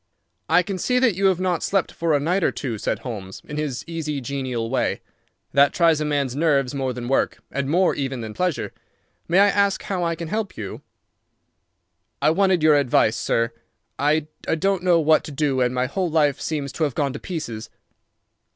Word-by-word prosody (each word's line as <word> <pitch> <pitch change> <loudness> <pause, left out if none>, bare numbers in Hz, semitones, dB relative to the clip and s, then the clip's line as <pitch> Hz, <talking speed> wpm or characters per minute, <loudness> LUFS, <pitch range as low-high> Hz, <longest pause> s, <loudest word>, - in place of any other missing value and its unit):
"I 180 - +5
can 190 +1 -4
see 250 +7 +1
that 250 -4 +4
you 195 +2 +2
have 185 -2 +2
not 180 -3 0
slept 195 -2 0
for 165 -2 0
a - - +2
night 175 +6 0
or - - +3
two," 120 -6 -4
said - - -1
Holmes, 100 -6 -7
in 150 - -7
his 145 -5 -3
easy, 160 -3 -3
genial 130 -3 -3
way. 130 +3 -1 0.5
"That 140 0 +5
tries 165 -3 +3
a - - 0
man's 140 -4 -1
nerves 140 -4 +2
more 135 -2 -1
than 125 -1 -6
work, 135 - +1
and 140 0 -2
more 180 +4 +3
even 135 -3 -3
than 110 -1 -6
pleasure. 180 +1 -2 0.5
May 170 - +2
I 200 +1 +6
ask 200 -1 +1
how 185 -3 -2
I 170 -1 0
can 165 -1 -6
help 215 -1 -3
you?" 105 -3 -6 1.4
"I 155 - +3
wanted 185 -1 +2
your 155 -2 +6
advice, 120 -5 +3
sir. 115 0 0 0.5
I 150 +2 +2 0.2
don't 190 +3 0
know 175 -2 +4
what 155 0 +4
to - - -7
do 140 -2 0
and 125 -1 +2
my 125 0 0
whole 175 +7 -1
life 150 -3 +2
seems 145 -4 -3
to 160 - -2
have 145 -5 -1
gone 140 -3 0
to 140 - -6
pieces." 150 - -5
150 Hz, 200 wpm, -23 LUFS, 135-175 Hz, 1.4 s, I